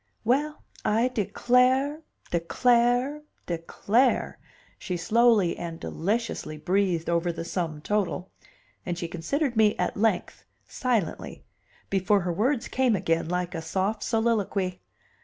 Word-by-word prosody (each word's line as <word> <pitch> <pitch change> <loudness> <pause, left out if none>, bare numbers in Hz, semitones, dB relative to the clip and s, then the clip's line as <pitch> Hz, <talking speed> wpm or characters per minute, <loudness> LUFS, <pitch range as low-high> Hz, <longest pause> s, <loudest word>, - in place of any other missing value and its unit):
"Well, 285 +6 0 0.2
I 225 +4 +2
declare, 255 - +2 0.3
declare, 245 - +2 0.2
declare!" 195 +8 0 0.4
she 180 -2 -3
slowly 215 -1 +3
and 165 -1 -6
deliciously 200 -4 -2
breathed 180 0 0
over 170 +1 +1
the 165 0 -6
sum 165 -4 -3
total; 190 -1 -1 0.5
and 175 -1 -3
she 175 - -3
considered 235 - -2
me 215 -1 +4
at - - -1
length, 210 -3 0 0.2
silently, 230 -10 -2 0.5
before 195 +1 +2
her 175 0 -2
words 240 - 0
came 255 -4 +2
again, 165 -3 0
like 180 0 -2
a 165 - -4
soft 195 +6 -1
soliloquy. 205 -5 0
200 Hz, 120 wpm, -26 LUFS, 175-240 Hz, 0.5 s, me